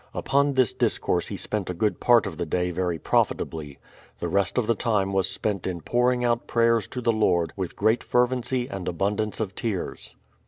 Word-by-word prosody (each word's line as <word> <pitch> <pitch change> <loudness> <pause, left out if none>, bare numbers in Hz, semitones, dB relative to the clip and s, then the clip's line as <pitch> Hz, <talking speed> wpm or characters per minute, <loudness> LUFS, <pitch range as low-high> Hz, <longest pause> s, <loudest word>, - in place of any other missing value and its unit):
Upon 140 +1 +2
this 130 -4 +3
discourse - - 0
he - - -5
spent 105 -4 -3
a 90 - -3
good 105 +4 0
part 120 -2 +5
of 90 -5 -6
the 85 - -1
day 90 +2 0
very 90 -1 -1
profitably. 75 -3 -1 0.4
The - - -3
rest 100 +3 0
of 125 - +2
the 115 - +2
time 105 -4 0
was 95 0 +1
spent 100 -3 -2
in 90 -2 -4
pouring 125 +4 +1
out 120 0 0
prayers 115 -2 +2
to 125 - -5
the 115 -1 +2
Lord 90 -6 +1
with 95 -3 -4
great 110 +2 +2
fervency 125 0 +1
and 95 -6 -6
abundance 100 +4 -1
of 105 -4 -2
tears. 105 -3 -4
105 Hz, 195 wpm, -25 LUFS, 90-120 Hz, 0.4 s, part